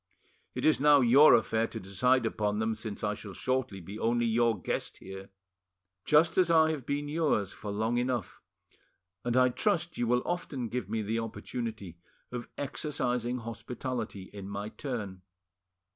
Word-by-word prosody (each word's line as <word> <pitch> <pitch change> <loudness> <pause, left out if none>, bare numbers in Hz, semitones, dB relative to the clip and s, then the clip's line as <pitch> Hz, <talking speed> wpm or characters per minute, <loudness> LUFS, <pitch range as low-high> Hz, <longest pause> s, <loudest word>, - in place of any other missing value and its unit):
It - - -2
is 155 - +4
now 145 0 +6
your 130 +5 +8
affair 115 0 +1
to - - -7
decide 120 +7 +2
upon 105 -2 0
them, 110 +1 0
since 110 0 -6
I 105 -1 +1
shall 105 -1 -9
shortly 130 -6 -1
be 100 +5 -8
only 120 +1 +1
your 115 -2 +2
guest - - -3
here." 95 0 -9 0.8
"Just 160 +4 +4
as 180 -2 +4
I 160 -1 +5
have 145 -6 -5
been 145 +1 -1
yours 145 - 0
for 105 - -7
long 110 +4 0
enough, 125 -2 -2 0.8
and 120 0 0
I 125 0 +6
trust 175 - 0
you 120 - +1
will 125 +1 +2
often 140 -9 -3
give 120 -5 -3
me 110 0 -1
the 110 +3 -1
opportunity 110 -5 -5 0.3
of 125 -1 -6
exercising 125 -4 -2
hospitality 115 -3 -5
in 100 -1 -7
my 100 +1 -4
turn. 105 -9 -5
120 Hz, 160 wpm, -30 LUFS, 105-130 Hz, 0.8 s, your